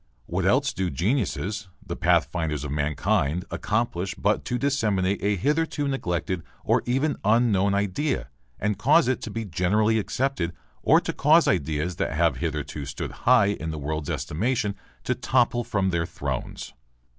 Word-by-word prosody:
What - - -1
else - - +3
do 95 0 -1
geniuses, 105 - -1 0.2
the - - -4
pathfinders 75 -5 +1
of 75 - -4
mankind, 75 +3 0
accomplish 100 -4 -1
but 105 +2 +1
to 125 - -1
disseminate 105 -8 +1
a 105 +1 +1
hitherto 150 - 0
neglected 90 - -2 0.2
or - - +3
even 135 +5 +1
unknown 105 -3 +3
idea 100 - -1 0.3
and 105 0 -1
cause 150 +4 +5
it 130 - 0
to - - -5
be 115 +1 -4
generally 105 +5 +2
accepted 110 -6 -1 0.3
or - - +5
to - - -3
cause - - +4
ideas 80 +4 0
that - - -1
have 80 -3 +2
hitherto 75 -1 -3
stood 70 - -5 0.2
high 120 -6 +6
in 85 -5 -3
the 80 - -4
world's 75 +1 -3
estimation 100 - -1 0.3
to 125 - +1
topple 120 -1 +1
from 100 -5 0
their 85 -1 0
thrones? 70 -7 -5
100 Hz, 155 wpm, -25 LUFS, 80-120 Hz, 0.3 s, high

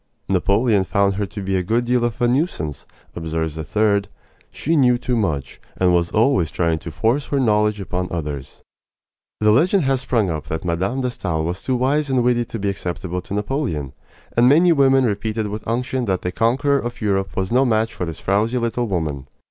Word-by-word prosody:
"Napoleon 100 +3 +2
found 100 +1 +1
her 105 -1 -1
to 100 -1 -7
be 95 0 -1
a 95 - +2
good 115 +7 0
deal 125 0 +1
of 120 -2 -2
a 120 - +3
nuisance," 120 - -1 0.3
observes 80 -1 -3
a 80 - -4
third. 100 +5 +1 0.4
"She 165 +4 -1
knew 125 -4 +4
too 125 0 -2
much, 80 - -2 0.2
and 90 -1 +3
was 85 -1 +2
always 105 - +2
trying 85 -2 0
to 85 - -8
force 115 - 0
her 140 - 0
knowledge 105 -3 +2
upon 90 -1 -3
others." 75 -5 -5 0.8
The 105 0 +5
legend 170 - +3
has 135 -1 +1
sprung 115 -8 0
up 80 -2 -5
that 80 +2 -4
Mme. 95 +10 -1
de 125 -1 -1
Stael 80 -8 -2
was 90 +3 -3
too 130 - -1
wise 140 +4 +1
and 130 -2 +2
witty 120 -1 +2
to 115 - -6
be 100 -1 -1
acceptable 90 -1 -4
to 100 +3 -6
Napoleon; 105 - -2 0.4
and 120 +1 +5
many 170 +5 +5
women 135 -3 +4
repeated 110 0 -2
with 105 +1 -6
unction 125 +2 -1
that 95 -4 -1
the 90 - -1
conqueror 135 - +2
of 120 -1 -5
Europe 95 -3 -1
was 95 +1 -2
no 125 +3 +4
match 115 -2 +1
for 90 - -3
this 80 - -5
frowsy 105 +5 0
little 120 0 -1
woman. 75 -8 -3
105 Hz, 205 wpm, -21 LUFS, 90-125 Hz, 0.8 s, The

